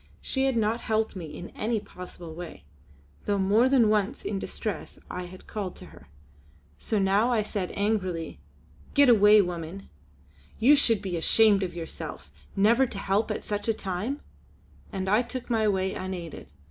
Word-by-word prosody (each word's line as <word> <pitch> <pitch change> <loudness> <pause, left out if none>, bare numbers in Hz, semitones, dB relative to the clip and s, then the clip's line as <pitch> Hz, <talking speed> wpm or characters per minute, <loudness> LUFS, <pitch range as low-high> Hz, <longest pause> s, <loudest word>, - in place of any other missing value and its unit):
She 265 0 -1
had 265 -3 +1
not 225 +2 +1
helped 220 -1 0
me 180 -3 -5
in 175 +3 -8
any 225 +1 -1
possible 180 -4 -10
way, 175 - -9 0.6
though 205 - +1
more 205 +6 +4
than 255 -5 +5
once 210 -2 0
in 200 -2 -2
distress 205 -4 -4
I 180 0 -4
had 185 +1 -12
called 200 -4 -5
to - - -10
her. 70 - -16 0.7
So 220 - -1
now 200 +5 +3
I 225 -3 +2
said 200 -3 -3
angrily: 185 -5 -1 0.6
"Get 285 -2 +6
away 210 -2 +7
woman! 175 +1 -6 0.7
You 265 +6 +6
should 225 -7 +3
be 180 -3 -2
ashamed 205 +4 +4
of 180 -2 -3
yourself 165 - -7 0.2
never 230 +6 +4
to 210 - -6
help 195 +3 0
at 215 - -3
such 205 0 -2
a 225 - +2
time," 210 +9 -3 0.7
and 190 -1 -3
I 210 +4 +4
took 250 0 -6
my 220 -2 +2
way 190 -1 +1
unaided. 175 - -6
205 Hz, 170 wpm, -27 LUFS, 185-225 Hz, 0.7 s, away